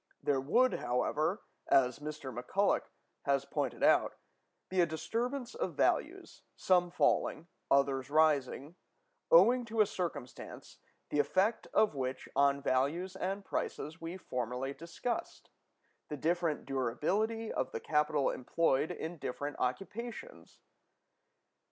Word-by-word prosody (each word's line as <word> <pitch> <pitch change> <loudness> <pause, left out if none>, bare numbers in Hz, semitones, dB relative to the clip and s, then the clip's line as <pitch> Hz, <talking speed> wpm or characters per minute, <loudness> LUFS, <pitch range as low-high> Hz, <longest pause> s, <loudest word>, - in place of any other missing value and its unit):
There 140 -2 +1
would, 245 - +3
however, 150 - 0 0.2
as 125 -1 +3
Mr. 145 -4 -6
McCulloch 195 +11 0 0.4
has 140 -1 +1
pointed 140 -4 -2
out, - - +4 0.5
be 185 -1 +2
a - - +5
disturbance 235 - -3
of - - -3
values, - - 0
some 180 -1 +3
falling, 165 -2 +1 0.2
others 135 -1 +2
rising, 150 +1 +2 0.5
owing 255 - +6
to 225 0 -4
a 215 - +7
circumstance, 165 -10 -6 0.3
the 145 - 0
effect 190 +10 +1
of 215 -6 +3
which 130 -1 -4
on 140 0 +3
values 150 +9 0
and 195 +1 -3
prices 160 +3 -4
we 165 +3 -5
formerly 125 -3 -3
discussed—the 170 - -7
different 165 0 0
durability 185 - -1
of - - -2
the - - -4
capital 150 -2 +1
employed 145 +2 +1
in 165 +2 -5
different 145 +2 -4
occupations. 235 - -5
155 Hz, 115 wpm, -33 LUFS, 135-195 Hz, 0.5 s, a